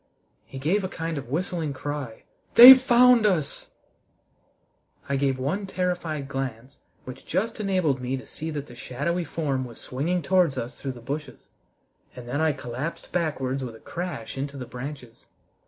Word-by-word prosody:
he - - -9
gave 170 +10 0
a 185 - -3
kind 165 -4 -4
of 125 - -10
whistling 165 0 -2
cry. 140 -3 -6 0.3
"They've 255 +2 +12
found 250 -2 +5
us." 165 -8 -2 1.4
I 140 - 0
gave 135 -1 +1
one 160 +10 -2
terrified 175 -6 -2
glance, 130 -2 -5 0.3
which 130 0 -9
just 220 +7 -2
enabled 185 -10 0
me 125 +1 -2
to 130 - -10
see 160 +1 -6
that 145 -3 -4
the 120 - -13
shadowy 150 +9 -3
form 145 -5 -2
was 120 -2 -10
swinging 165 +7 -2
towards 180 -2 +2
us 120 +1 -5
through 135 -2 -3
the 120 - -12
bushes, 140 +1 -6 0.7
and 125 -1 -10
then 140 +5 -2
I 160 -1 +3
collapsed 130 +4 -6
backwards 135 -6 -1
with 120 -3 -6
a - - -14
crash 155 -9 -6
into 140 +1 -4
the 125 - -6
branches. 125 -1 -9
145 Hz, 165 wpm, -25 LUFS, 130-175 Hz, 1.4 s, They've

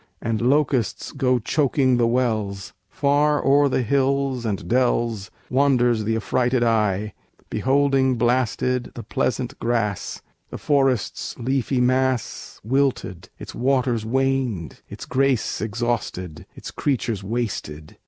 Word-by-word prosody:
And 115 -1 -2
locusts 130 -2 +1
go 130 -3 +1
Choking 130 +1 +1
the 120 -1 +3
wells. 110 -6 -1 0.2
Far 145 +1 +1
o'er 140 +1 +4
the 130 - 0
hills 135 -1 0
and 100 -3 -3
dells 120 -4 0 0.2
Wanders 125 -4 +2
th' 110 +1 0
affrighted 125 +2 +1
eye, 105 -3 +1 0.4
beholding 135 -1 +2
blasted 125 +1 0
The - - -7
pleasant - - -2
grass: 115 -4 -2 0.3
the - - -6
forest's 135 -7 0
leafy 130 +1 -1
mass 130 -1 0
Wilted; 120 -7 -1
its - - -9
waters 125 -3 +1
waned; 125 - -1
its - - -8
grace 135 -3 0
exhausted; 110 -7 -3
Its - - -8
creatures 120 -7 -2
wasted. 95 -9 -4
125 Hz, 115 wpm, -22 LUFS, 110-135 Hz, 0.4 s, o'er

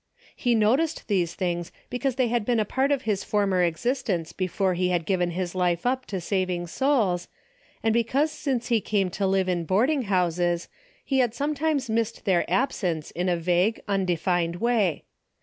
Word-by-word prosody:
He 245 -2 +1
noticed 260 +10 +1
these 180 -5 0
things 175 -2 -2 0.2
because 250 +1 -1
they 255 -2 +2
had 235 -1 0
been 235 +1 +1
a 215 - +1
part 265 +6 0
of 275 -2 +1
his 205 -4 -1
former 200 -3 +1
existence 180 0 -1
before 185 0 0
he 180 +1 0
had 175 -2 0
given 180 -2 +1
his 175 0 -3
life 180 -1 0
up 255 +1 0
to 195 - -3
saving 180 -1 -1
souls, 205 - +1 0.6
and 225 -1 +2
because 260 +7 +1
since 265 -6 -2
he 230 -3 +3
came 195 -2 0
to 195 +1 -1
live 190 -1 +1
in 175 -2 0
boarding 245 - +1
houses, 175 -2 0 0.4
he 270 -1 +1
had 240 -3 +1
sometimes 290 0 0
missed 225 0 -2
their 180 -3 +2
absence 175 - -1
in 180 +1 -1
a 175 - +1
vague, 180 +6 +1
undefined 175 -3 0
way. 210 -5 +1
195 Hz, 175 wpm, -25 LUFS, 175-240 Hz, 0.6 s, he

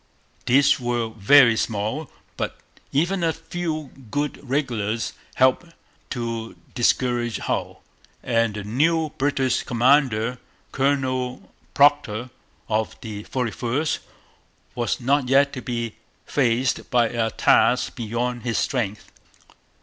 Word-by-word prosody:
These 140 +4 +5
were 120 -2 -1
very 115 +3 +6
small. 110 +7 -2 0.3
But - - -3 0.3
even 175 +6 +1
a 165 - +3
few 160 -3 -4 0.2
good 145 +5 -2
regulars 120 -6 -2 0.2
helped 130 +7 +2 0.3
to 115 -2 -4 0.2
discourage 120 -2 +1
Hull; - - -3 0.4
and 115 -3 +1
the 105 - -5
new 155 +9 +1
British 135 -2 +1
commander, 125 -2 +2 0.3
Colonel 130 -2 -1 0.2
Procter 135 -5 +3 0.4
of 110 0 -1
the 105 -3 -7
41st, 130 +4 -1 0.7
was 120 -1 -1
not 130 +1 +1
yet 140 +1 +4
to 125 - -5
be 115 -2 -3 0.3
faced 125 -1 0
by 120 -2 +3
a 115 -1 0
task - - +3
beyond 120 +2 -2
his 115 -1 -1
strength. 110 -6 -2
125 Hz, 110 wpm, -23 LUFS, 115-140 Hz, 0.7 s, very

